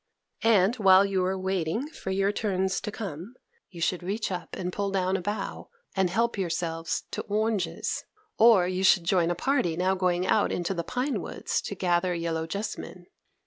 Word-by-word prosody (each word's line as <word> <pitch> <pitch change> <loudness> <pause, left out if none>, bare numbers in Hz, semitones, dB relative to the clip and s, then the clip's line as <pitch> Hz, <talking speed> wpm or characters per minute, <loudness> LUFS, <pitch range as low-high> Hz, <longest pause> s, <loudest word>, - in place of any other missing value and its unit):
And, 220 0 +4
while 195 -2 +6
you 195 -2 0
were 190 +1 0
waiting 190 - -1
for 250 - -7
your 195 +1 +1
turns 190 -3 -1
to 210 - -4
come, 200 - -7 0.3
you 175 - -11
should 175 +2 0
reach 200 +4 -2
up 180 - -5
and 180 -1 -4
pull 200 -1 -1
down 190 -1 0
a 195 - -1
bough, 205 +4 -4 0.3
and 190 -2 +2
help 230 +3 0
yourselves 165 -2 -2
to - - -3
oranges; 215 -1 -1 0.4
or 220 -6 +6
you 185 +1 -1
should 185 -2 +5
join 170 -1 +2
a 175 - 0
party 180 - 0
now 185 +1 +2
going 180 -1 +1
out - - +2
into 175 +2 -1
the 170 -2 -3
pine 255 - -2
woods - - -2
to - - -5
gather 175 0 +1
yellow 165 -1 -2
jessamine. 200 -1 -5
190 Hz, 185 wpm, -27 LUFS, 175-205 Hz, 0.4 s, while